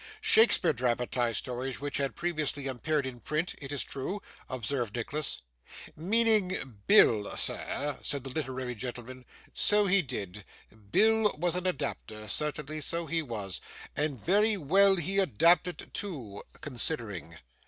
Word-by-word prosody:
'Shakespeare 225 - +5
dramatised 120 -1 0
stories 130 +1 -3
which 145 +1 -3
had 140 -1 -2
previously 155 -5 -2
appeared 140 +2 -1
in 125 -2 -6
print, 155 +7 -2
it 140 0 -7
is 145 - 0
true,' 140 +10 -4 0.3
observed 125 -2 -3
Nicholas. 140 - -2 0.5
'Meaning 190 - +1
Bill, 110 - +5
sir?' 145 0 -1
said 140 -3 -2
the 135 - -6
literary 130 -4 -4
gentleman. 125 +2 -7 0.3
'So 210 0 +4
he 195 0 +4
did. 105 - -6 0.5
Bill 220 - +4
was 175 +2 0
an 180 0 -1
adapter, 135 -9 -4
certainly, 150 +6 -3
so 170 +3 -1
he 165 +2 -1
was 105 - -5 0.3
and 145 -2 -1
very 210 - +3
well 195 +5 +4
he 190 +3 -1
adapted 175 -1 +2
too 130 - -5 0.2
considering. 115 - -2
145 Hz, 130 wpm, -29 LUFS, 125-180 Hz, 0.5 s, Shakespeare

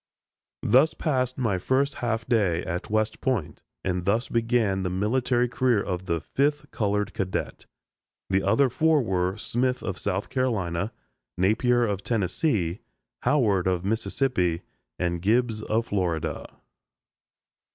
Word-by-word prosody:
Thus 135 +8 +4
passed 130 -5 0
my 110 -8 0
first 135 +8 +1
half 115 -1 -1
day 95 -8 +2
at 90 -1 -4
West 110 0 0
Point, 125 - -1 0.2
and 90 -1 -1
thus 110 +5 +1
began 115 -4 +1
the 90 - -1
military 120 +6 +1
career 120 -2 +2
of 95 -2 -3
the 85 -1 0
fifth 145 - -1
colored 105 -1 -1
cadet. 95 -1 -3 0.6
The 95 0 +2
other 115 +9 +3
four 155 0 +3
were 95 -2 0
Smith 125 +3 -1
of 95 - -3
South 95 +3 -2
Carolina, 105 -7 -1 0.5
Napier 120 +6 +3
of 100 -3 -2
Tennessee, 100 - 0 0.4
Howard 105 -11 +2
of 90 -1 0
Mississippi, 110 -5 0 0.3
and 85 -1 -1
Gibbs 110 +2 +1
of 110 +2 0
Florida. 90 -7 -2
110 Hz, 130 wpm, -26 LUFS, 95-125 Hz, 0.6 s, Thus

